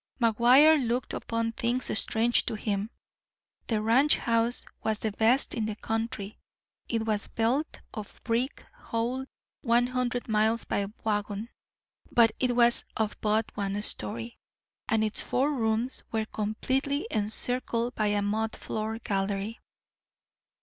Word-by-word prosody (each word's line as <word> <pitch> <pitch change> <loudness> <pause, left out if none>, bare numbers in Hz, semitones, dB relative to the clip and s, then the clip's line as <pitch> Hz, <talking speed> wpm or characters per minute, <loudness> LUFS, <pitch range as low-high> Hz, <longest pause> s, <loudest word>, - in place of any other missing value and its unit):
McGuire 255 +6 +6
looked 240 +2 -1
upon 230 0 -2
things 240 +2 -1
strange 230 +2 +3
to - - -2
him. 210 -1 -2 0.8
The 215 -2 0
ranch 260 +7 +5
house 230 +1 +1 0.2
was 220 -1 0
the 220 0 -2
best 225 +6 +2
in 220 -3 -1
the 215 - -3
country. 225 -2 -4 0.5
It 225 -1 -1
was 215 -2 0
built 250 +7 -1
of 215 -4 -8
brick 240 +4 -1
hauled 245 +3 -3 0.3
one 240 -1 +3
hundred 250 -1 -2
miles 220 +1 +1
by 200 -1 -1 0.2
wagon, 210 +1 -2 0.6
but 230 -2 +5
it 250 -1 +1
was 240 0 +5
of 215 -1 0
but 215 +1 0
one 200 0 -2
story, 115 - -1 0.5
and 220 0 +2
its 215 -1 0
four 275 +4 +1
rooms 230 0 +1
were 220 -1 0
completely 260 +7 -1
encircled 235 +2 -1
by 215 -2 0
a 205 0 +1
mud 220 +2 -1
floor 220 +1 -4
"gallery." 200 0 -2
225 Hz, 135 wpm, -28 LUFS, 215-245 Hz, 0.8 s, McGuire